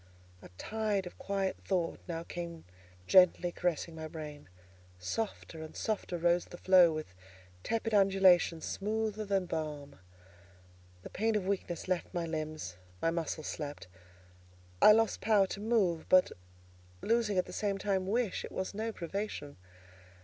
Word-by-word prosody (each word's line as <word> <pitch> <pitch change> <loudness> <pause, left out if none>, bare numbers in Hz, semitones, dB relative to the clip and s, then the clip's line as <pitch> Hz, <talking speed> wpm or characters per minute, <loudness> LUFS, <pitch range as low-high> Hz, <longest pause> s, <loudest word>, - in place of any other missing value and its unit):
A - - -12
tide 215 - -1
of 180 - -10
quiet 195 -1 -1
thought 180 -4 -1
now 165 -1 -4
came 170 -1 -7 0.4
gently 180 - +5
caressing 170 -2 -2
my 160 0 -6
brain; 150 - -8 0.5
softer 160 - -4
and 160 - -9
softer 210 -5 -2
rose 175 +1 +2
the 175 - -11
flow, 180 -2 +6
with 155 -10 -5 0.5
tepid 225 - -2
undulations 190 -4 +4
smoother 215 +1 -2
than 195 -2 +1
balm. 150 - -5 1.0
The - - -9
pain 220 +2 0
of 205 -3 0
weakness 185 -3 -2
left 185 0 -2
my 170 -1 0
limbs, 155 - -4 0.2
my 165 - +1
muscles 160 -2 -3
slept. 145 -9 -5 1.0
I - - +10
lost 225 0 +3
power 205 -2 +4
to 195 - -6
move; 205 -7 +1
but, 185 0 +6 0.7
losing 225 -3 +1
at 180 - +2
the - - -10
same 200 -2 -1
time 195 -1 -1
wish, 225 -1 0
it - - -7
was 190 +1 -3
no 220 +2 -2
privation. 175 -6 -5
185 Hz, 145 wpm, -32 LUFS, 165-205 Hz, 1.0 s, I